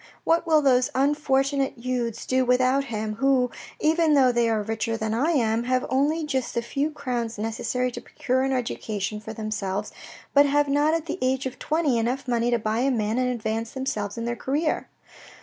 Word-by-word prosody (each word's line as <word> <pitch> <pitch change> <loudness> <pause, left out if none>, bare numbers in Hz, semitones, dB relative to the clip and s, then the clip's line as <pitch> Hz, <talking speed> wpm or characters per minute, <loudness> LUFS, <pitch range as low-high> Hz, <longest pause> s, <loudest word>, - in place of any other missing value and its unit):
What 335 +1 +2
will 310 -2 +4
those 255 -2 +4
unfortunate 275 -1 +1
youths 240 -2 -3
do 260 0 +2
without 255 +2 +2
him, 215 -3 -4
who, 260 -1 +2 0.3
even 315 0 +3
though 260 -3 +5
they 235 -1 +2
are 220 -2 0
richer 225 +1 -2
than 220 0 -2
I 265 +8 +1
am, 230 -4 +1
have 255 0 +1
only 300 +5 +1
just 265 -4 -2
the 235 - 0
few 280 +5 -1
crowns 245 -6 -3
necessary 225 +3 -2
to 240 - -7
procure 255 +2 -1
an 270 0 0
education 215 -5 -3
for 220 +1 -8
themselves, 210 -2 -3 0.4
but 285 0 +6
have 290 +1 +2
not 290 +3 +2
at 330 -1 -2
the 335 +3 -4
age 260 +1 0
of 255 -1 -5
twenty 300 -6 +1
enough 250 +4 -2
money 240 -1 +1
to 240 - +2
buy 220 0 -1
a 265 +3 +2
man 225 -2 0
and 255 0 +1
advance 225 -1 -3
themselves 225 -7 -3
in 230 - -3
their 240 0 -1
career." 295 +6 -1
250 Hz, 195 wpm, -25 LUFS, 225-275 Hz, 0.4 s, but